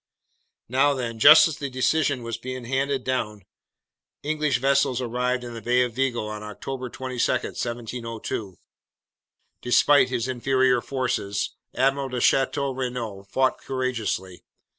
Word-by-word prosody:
"Now 135 +4 +3
then, 115 -3 -4
just 155 +7 +9
as 160 - -6
this 140 - -3
decision 135 0 +1
was 115 -1 -4
being 130 0 -6
handed 135 +1 -1
down, 105 -6 -2 0.8
English 150 -2 0
vessels 135 -1 +2
arrived 125 +1 -1
in 120 -1 -7
the 115 - -7
Bay 125 +3 +3
of 120 -2 -3
Vigo 125 -3 -1
on 105 0 -6
October 125 +5 -6
22, 130 0 -2
1702. 115 -5 -4 1.0
Despite 130 +2 +4
his 125 -1 -2
inferior 130 0 +2
forces, 125 -7 -2 0.2
Admiral 135 +1 +1
de 125 -1 -3
Chateau 135 +2 +2
Renault 120 -6 -5
fought 130 +3 +1
courageously. 120 -8 -3
125 Hz, 130 wpm, -24 LUFS, 115-135 Hz, 1.0 s, just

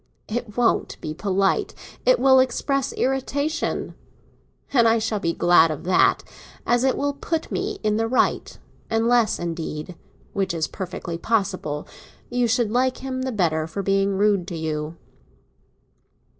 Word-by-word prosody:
It 225 -1 -4
won't 240 -1 +1
be 155 - -5
polite—it 195 - 0
will, 265 -1 +6
express 265 +1 0
irritation; 275 +4 -1 0.8
and 235 -4 +5
I 225 0 +4
shall 220 -1 -1
be 170 -4 0
glad 170 -1 +5
of 155 -1 -5
that, 180 +1 +3 0.4
as 240 +1 +2
it 265 - +2
will 285 0 0
put 320 +3 -3
me - - -2
in 215 0 +1
the 225 0 0
right; 255 - 0 0.3
unless, 230 0 +2
indeed—which 170 +3 -5
is 160 -1 0
perfectly 180 -3 -6
possible—you 200 +4 -2
should 230 -1 +1
like 255 +2 +1
him 260 -1 -3
the 260 0 -2
better 160 -7 0
for 195 +5 -4
being 195 0 +1
rude 200 -3 +2
to 175 -4 -5
you." 155 0 -3
210 Hz, 135 wpm, -23 LUFS, 175-245 Hz, 0.8 s, will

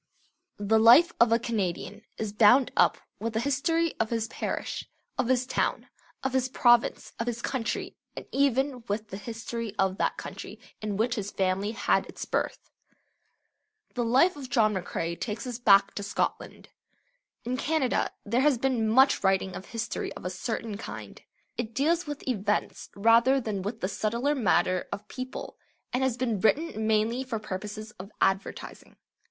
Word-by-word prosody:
The 205 +2 +2
life 245 +10 +7
of 235 -1 +5
a 230 - +5
Canadian 205 -3 -3 0.2
is 215 -2 -3
bound 230 +5 +5
up - - +4 0.2
with 230 0 -3
the 220 - 0
history 320 +6 +1
of 225 - +1
his 225 -1 -1
parish, - - -4 0.3
of - - 0
his 255 0 +2
town, 255 - -1 0.3
of 265 -1 -1
his 260 -1 +1
province, 240 -2 +3
of 230 - -2
his 240 0 -3
country, 250 -4 -2 0.2
and - - -7
even 270 -2 +1
with 210 +1 -3
the 190 - -6
history 225 0 -5
of 190 -1 +1
that - - 0
country - - -8 0.2
in 210 -2 -3
which 230 +3 +1
his 205 -4 -3
family 195 +3 -1
had - - +1
its - - -7
birth. - - -3 1.2
The 245 - -1
life 265 +10 +4
of 275 -3 -8
John 220 -3 +3
McCrae 170 -3 -3
takes 220 +2 -4
us 245 -2 -5
back 200 -4 +5
to - - -4
Scotland. 200 0 -3 0.8
In 250 +2 -1
Canada 280 -1 0 0.2
there 240 +2 +1
has 285 -2 +4
been 240 -3 +1
much 265 +2 +5
writing 190 -1 +1
of 190 - -8
history 230 0 -4
of - - -11
a 180 - -2
certain 220 +2 -4
kind. - - -8 0.4
It 230 -2 -4
deals 325 +5 +1
with 290 -2 -6
events 210 -4 -1
rather 230 +6 +5
than 215 -6 -3
with 215 +4 -5
the 185 - 0
subtler 235 +8 0
matter 185 -7 +1
of 210 +1 -6
people, 255 +2 -7 0.4
and 250 - +1
has 260 -2 +1
been 235 -5 -1
written 220 - +1
mainly 220 +4 +1
for 255 -3 -3
purposes 210 +1 -6
of 190 +1 -8
advertising. 195 0 -2
230 Hz, 170 wpm, -28 LUFS, 205-255 Hz, 1.2 s, life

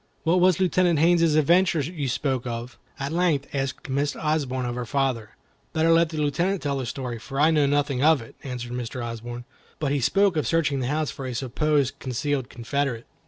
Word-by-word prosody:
"What 170 +3 +3
was 185 -1 +4
Lieutenant 180 -2 +3
Haines's 165 0 +4
adventure 170 +3 +4
you 145 -1 -3
spoke 130 -1 -1
of?" 120 +1 -6 0.2
at 140 +1 -3
length 165 -5 +1
asked 135 -1 -3
Miss 140 +2 -1
Osborne 140 -5 -1
of 120 - -2
her 125 0 -3
father. 120 -3 -1 0.4
"Better 160 0 +3
let 165 0 +4
the 160 - -6
Lieutenant 170 +6 0
tell 140 -2 -1
the 130 - -4
story, 125 -3 -4
for 135 +4 -6
I 155 +2 +5
know 150 -3 +3
nothing 140 -2 +1
of 155 -1 +5
it," 115 - -11
answered 125 -3 -5
Mr. 125 0 -4
Osborne; 120 +1 -6 0.3
"but 145 -3 -1
he 145 - +1
spoke 195 - +3
of 155 - 0
searching 150 -4 +1
the 125 - -2
house 150 +2 -1
for 135 -2 -6
a 125 - -4
supposed 140 +2 0
concealed 130 +1 -2
Confederate." 125 -1 -2
140 Hz, 200 wpm, -25 LUFS, 125-160 Hz, 0.4 s, I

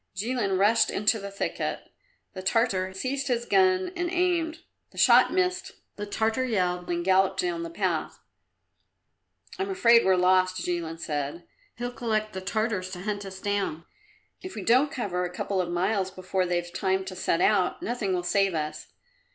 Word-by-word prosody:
Jilin 210 -1 -1
rushed 210 +4 +4
into 210 +2 +1
the 200 0 -6
thicket. 200 - -4 0.4
The 185 - -6
Tartar 190 -2 +1
seized 265 +8 -3
his 240 -2 0
gun 375 +1 +3
and 350 0 -1
aimed; 345 -2 0 0.3
the - - -19
shot - - +6
missed; 365 -1 0 0.2
the 205 0 -6
Tartar 220 +4 0
yelled 180 -7 -1
and 175 0 -1
galloped 190 - +3
down 360 -2 -1
the 335 - -5
path. 335 - -2 1.4
"I'm 390 +1 -1
afraid 235 -11 +5
we're 190 0 +4
lost," 185 0 +3
Jilin 170 -2 -3
said. 150 +1 -4 0.3
"He'll 245 +1 -4
collect 215 -3 -2
the 190 - -5
Tartars 210 -1 -1
to 180 - -6
hunt 205 0 -3
us 190 -1 -9
down. 195 -5 -2 0.6
If 370 - -8
we 210 - -5
don't 255 +8 +4
cover 185 -7 -2
a 180 - -2
couple 185 +2 -2
of 175 - -4
miles 190 +2 0
before 185 0 -2
they've 175 0 -2
time 190 0 0
to 190 -1 -7
set 175 -2 0
out, 195 -4 +2
nothing 230 -5 -2
will 180 -1 0
save 195 0 +1
us." 155 -1 -4
200 Hz, 170 wpm, -27 LUFS, 185-245 Hz, 1.4 s, shot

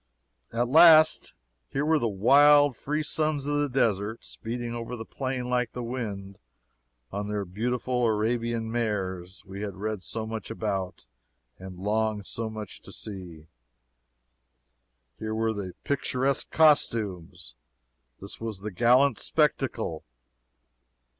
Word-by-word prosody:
At 120 +1 0
last, 155 - +6 0.3
here 140 +2 -1
were 155 0 +3
the 115 - 0
"wild, 140 +7 +5
free 150 +5 -2
sons 155 -2 -1
of 145 0 0
the 145 -1 0
desert, 110 -4 0
speeding 120 +1 -5
over 120 +1 -5
the 115 -1 -7
plain 130 -1 -4
like 125 -2 0
the 125 - -5
wind, 105 -5 -5 0.7
on 100 +1 -3
their 105 -1 -2
beautiful 125 +5 -1
Arabian 115 +1 -1
mares" 95 -5 -3
we 95 +1 -8
had 100 -2 -4
read 105 0 -4
so 110 +5 -4
much 110 -2 -6
about 100 - -3 0.5
and 95 -1 -9
longed 105 +1 -1
so 115 +2 -4
much 110 -3 -8
to - - -10
see! 90 -7 -8 1.7
Here 110 0 -3
were 110 0 0
the 95 -4 -5
"picturesque 135 -1 0
costumes!" 110 - +1 0.7
This 100 - -8
was 110 -4 -4
the 105 +1 -5
"gallant 120 +6 +4
spectacle!" 130 - 0
115 Hz, 125 wpm, -27 LUFS, 100-130 Hz, 1.7 s, last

